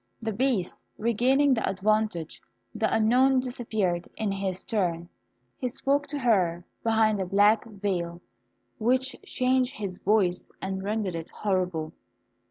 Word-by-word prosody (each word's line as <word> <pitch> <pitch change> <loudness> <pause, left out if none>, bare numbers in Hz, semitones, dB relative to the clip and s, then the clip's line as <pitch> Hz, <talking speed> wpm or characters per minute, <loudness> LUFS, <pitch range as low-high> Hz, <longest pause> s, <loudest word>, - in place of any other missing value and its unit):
The 225 -1 -3
Beast 205 - -1
regaining 255 +5 +3
the 225 - 0
advantage, 205 -4 0 0.3
the 220 0 0
unknown 255 +4 +4
disappeared 220 -8 -2
in 215 -2 -1
his 195 -1 -3
turn. 175 -5 -1 0.5
He 255 - -1
spoke 280 +4 0
to 290 - -4
her 185 -9 +1 0.2
from 230 - -1
behind 220 -2 +3
a - - -1
black 205 +5 +4
veil, 190 -5 -3 0.6
which 255 +3 +1
changed 255 0 +1
his 195 -4 -5
voice, 190 -4 +1
and 190 0 -3
rendered 205 -1 -2
it 165 -1 -5
horrible. 180 -6 -1
215 Hz, 135 wpm, -27 LUFS, 185-245 Hz, 0.6 s, unknown